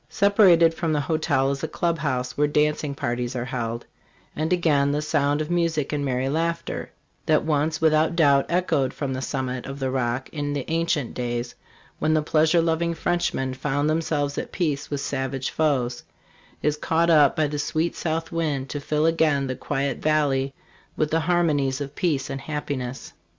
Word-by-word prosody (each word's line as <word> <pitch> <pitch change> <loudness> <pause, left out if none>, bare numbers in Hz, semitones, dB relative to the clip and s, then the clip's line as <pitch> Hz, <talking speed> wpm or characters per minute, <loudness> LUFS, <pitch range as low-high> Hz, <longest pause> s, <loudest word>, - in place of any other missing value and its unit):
Separated 190 -5 +5
from 165 -1 -1
the 150 - +1
hotel 145 -3 +1
is 140 +2 -4
a - - 0
club 170 +1 -1
house 125 -3 -2
where 150 0 +2
dancing 150 -1 0
parties 120 0 -2
are 125 -1 -2
held; 120 -2 -4 0.5
and 155 +2 -1
again 150 -6 +3
the 145 - 0
sound 145 -1 +1
of 155 - -4
mu 170 -1 +2
sic 150 -3 -3
and 145 -1 -1
merry 130 -1 -1
laughter, 165 +3 -2 0.4
that 155 -1 +3
once 155 +1 0
without 160 +1 +3
doubt 140 -4 +4
echoed 165 -7 +1
from 140 -3 -3
the 130 - -3
summit 130 -2 -3
of 135 0 -6
the 135 -2 -2
Rock 130 0 -1
in 145 -2 -3
the 140 -3 -3
ancient 165 -6 0
days 120 -1 -3 0.5
when 155 - +2
the 155 - +2
pleasure 160 +2 +3
loving 170 +1 0
Frenchmen 160 -6 -1
found 145 +2 -1
themselves 155 -2 0
at - - -6
peace 150 -6 -1
with 145 -1 -3
savage 135 0 -2
foes, 130 -6 0 0.6
is 150 0 +1
caught 165 +2 +2
up 150 -4 +5
by 155 - +2
the 145 0 -3
sweet 155 +3 -1
south 165 0 -2
wind 150 -5 -1
to 145 - -3
fill 150 +2 0
again 160 -4 +2
the 130 -1 -3
quiet 135 0 -2
valley 140 -3 +1 0.5
with 155 -1 0
the 165 - +3
harmonies 155 -5 +1
of 140 -1 -5
peace 150 -5 0
and 135 0 -5
happiness. 135 -2 -5
150 Hz, 180 wpm, -24 LUFS, 135-160 Hz, 0.6 s, Separated